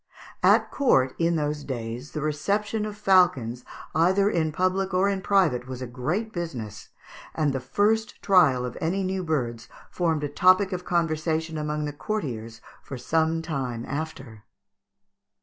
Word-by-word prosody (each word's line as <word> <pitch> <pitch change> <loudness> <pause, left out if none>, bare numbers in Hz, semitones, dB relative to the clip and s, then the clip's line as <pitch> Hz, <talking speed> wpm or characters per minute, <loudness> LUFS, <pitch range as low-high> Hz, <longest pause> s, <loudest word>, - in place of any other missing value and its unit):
At - - +4
court, 135 - +3
in 170 0 +2
those 150 -1 -2
days, 120 +1 -6
the 150 - -3
reception 205 +8 -1
of 210 -1 -7
falcons 175 - +3 0.3
either 190 +5 +3
in 160 -4 0
public 185 +3 0
or 190 +2 +3
in 195 -1 -1
private 170 -12 +2
was 130 -1 -6
a 130 - -4
great 155 - -3
business, 130 - -6 0.5
and 150 -3 +1
the 135 - -1
first 210 - 0
trial 155 -11 +4
of 125 - -6
any 180 +4 0
new 190 0 -2
birds 120 -8 -2 0.2
formed 165 -4 0
a - - 0
topic 185 +6 +4
of 180 -1 -4
conversation 160 -1 -1
among 150 0 -2
the 145 - -4
courtiers 120 - -4 0.2
for 135 - -8
some 160 +5 0
time 130 -7 -3
after. 135 -7 -6
160 Hz, 150 wpm, -25 LUFS, 130-185 Hz, 0.5 s, At